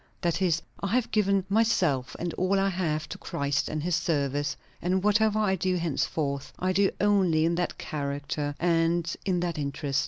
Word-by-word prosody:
That 170 Hz, +1 st, 0 dB
is, 165 Hz, -4 st, +2 dB, 0.2 s
I 200 Hz, -, -2 dB
have 250 Hz, -2 st, 0 dB
given 200 Hz, -3 st, +2 dB
myself 180 Hz, -, +1 dB
and 170 Hz, -1 st, -3 dB
all 190 Hz, +2 st, +1 dB
I 195 Hz, 0 st, +2 dB
have 155 Hz, -5 st, -1 dB
to -, -, -7 dB
Christ 140 Hz, 0 st, -1 dB
and 155 Hz, -1 st, -3 dB
his 180 Hz, +1 st, -1 dB
service; 145 Hz, -4 st, 0 dB, 0.2 s
and 185 Hz, +2 st, 0 dB
whatever 210 Hz, +1 st, +3 dB
I 210 Hz, -3 st, +2 dB
do 185 Hz, 0 st, 0 dB
henceforth, 150 Hz, -4 st, -1 dB
I 185 Hz, +1 st, 0 dB
do 195 Hz, +1 st, +4 dB
only 190 Hz, -6 st, +3 dB
in 170 Hz, -, +2 dB
that 175 Hz, +1 st, -1 dB
character 145 Hz, -1 st, -3 dB
and 170 Hz, 0 st, +1 dB
in 180 Hz, -3 st, +1 dB
that 170 Hz, -3 st, -2 dB
interest. 140 Hz, -1 st, -1 dB
170 Hz, 180 wpm, -27 LUFS, 150-190 Hz, 0.2 s, do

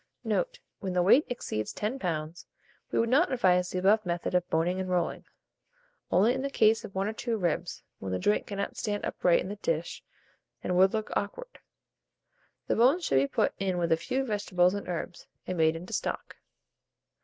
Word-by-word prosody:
Note. -, -, -1 dB, 0.2 s
When 190 Hz, -2 st, -3 dB
the 180 Hz, -1 st, +2 dB
weight 250 Hz, -, +5 dB
exceeds 110 Hz, -, -3 dB
10 225 Hz, +6 st, -3 dB
lbs., 165 Hz, -2 st, -3 dB, 0.4 s
we -, -, -2 dB
would 230 Hz, -, +3 dB
not 295 Hz, +8 st, +3 dB
advise 180 Hz, -7 st, +3 dB
the -, -, -3 dB
above 205 Hz, +4 st, +4 dB
method 175 Hz, 0 st, -2 dB
of 180 Hz, -1 st, +1 dB
boning 175 Hz, +3 st, +1 dB
and 185 Hz, -1 st, -3 dB
rolling; 180 Hz, -1 st, -1 dB, 0.8 s
only 210 Hz, +7 st, +4 dB
in 260 Hz, -, -2 dB
the 275 Hz, -, -2 dB
case 225 Hz, -4 st, +3 dB
of 195 Hz, -, -10 dB
1 195 Hz, +1 st, 0 dB
or 215 Hz, -, -2 dB
2 230 Hz, 0 st, -2 dB
ribs, 175 Hz, -2 st, -2 dB, 0.2 s
when 95 Hz, -, -5 dB
the 95 Hz, -, 0 dB
joint 105 Hz, +3 st, +1 dB
cannot 200 Hz, -1 st, -4 dB
stand 205 Hz, -2 st, -2 dB
upright 175 Hz, -1 st, +2 dB
in -, -, -5 dB
the 205 Hz, -, -5 dB
dish, 165 Hz, -4 st, -2 dB, 0.6 s
and 180 Hz, -, -1 dB
would 190 Hz, +1 st, +5 dB
look 215 Hz, -1 st, -3 dB
awkward. -, -, -4 dB, 1.1 s
The -, -, 0 dB
bones 275 Hz, +10 st, +4 dB
should -, -, +2 dB
be 135 Hz, +1 st, +3 dB
put -, -, +1 dB
in 190 Hz, -2 st, 0 dB
with 170 Hz, -1 st, 0 dB
a -, -, +6 dB
few 260 Hz, +11 st, -2 dB
vegetables 185 Hz, -5 st, +1 dB
and 200 Hz, -, -5 dB
herbs, 175 Hz, 0 st, -5 dB, 0.2 s
and 185 Hz, -, -3 dB
made 160 Hz, -1 st, +3 dB
into 175 Hz, +3 st, -8 dB
stock. -, -, -3 dB
185 Hz, 195 wpm, -29 LUFS, 175-220 Hz, 1.1 s, a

